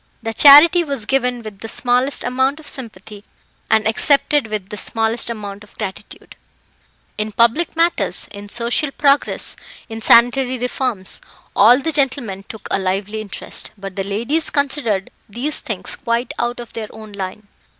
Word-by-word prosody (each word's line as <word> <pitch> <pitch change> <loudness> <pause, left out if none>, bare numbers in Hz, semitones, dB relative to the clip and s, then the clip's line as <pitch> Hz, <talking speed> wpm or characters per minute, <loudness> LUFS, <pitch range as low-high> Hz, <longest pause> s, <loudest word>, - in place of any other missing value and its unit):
The 225 0 -3
charity 305 +7 +8
was 275 -8 -4
given 250 -1 0
with 210 -3 -9
the 225 - -7
smallest 250 +4 0
amount 260 +4 0
of 315 - -12
sympathy, 215 -4 -6 0.5
and 220 0 +3
accepted 280 +3 +2
with 210 -3 -5
the 210 - -6
smallest 225 +3 -1
amount 205 -3 -6
of 210 - -20
gratitude. 195 -3 -8 0.8
In 215 0 -2
public 235 +12 +2
matters, 335 +1 +1
in 205 0 -10
social 235 +6 0
progress, 280 0 +1 0.3
in 225 0 -6
sanitary 245 +3 +4
reforms, 245 -5 -2 0.3
all 235 +4 +7
the 320 +3 -2
gentlemen 260 -9 -1
took 220 -2 -8
a - - +1
lively 195 +3 -2
interest; 205 -2 -5
but 195 -1 -8
the 195 - -2
ladies 235 +11 -1
considered 270 -9 -1 0.2
these 265 +9 -2
things - - -4
quite 235 +1 -2
out 240 +1 -2
of 240 -2 -9
their 220 -1 -5
own 215 -1 -12
line. 200 +1 -7
235 Hz, 155 wpm, -19 LUFS, 210-270 Hz, 0.8 s, charity